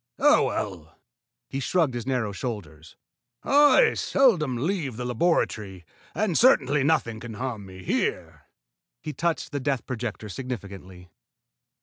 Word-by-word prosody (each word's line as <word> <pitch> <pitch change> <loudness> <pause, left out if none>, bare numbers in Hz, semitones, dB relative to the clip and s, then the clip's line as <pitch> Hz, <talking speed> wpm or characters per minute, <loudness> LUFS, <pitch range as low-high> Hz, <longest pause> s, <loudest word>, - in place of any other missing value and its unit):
Oh, - - +5
well!" - - -4 0.5
He 135 - -4
shrugged 155 -1 +1
his 120 0 -5
narrow 125 -6 -1
shoulders. 85 - -7 0.5
"I 295 - +5
seldom 165 - +2
leave 145 - -2
the 125 - -4
laboratory, 110 - -1 0.3
and 205 -5 0
certainly 150 - +4
nothing 135 -7 +1
can 115 -1 -8
harm 115 -4 -5
me 95 0 -11
here." - - -2 0.6
He 155 - -5
touched 170 +1 -2
the 145 - -2
death 135 -2 -2
projector 120 -4 -5
significantly. 95 -6 -8
125 Hz, 125 wpm, -25 LUFS, 105-155 Hz, 0.6 s, Oh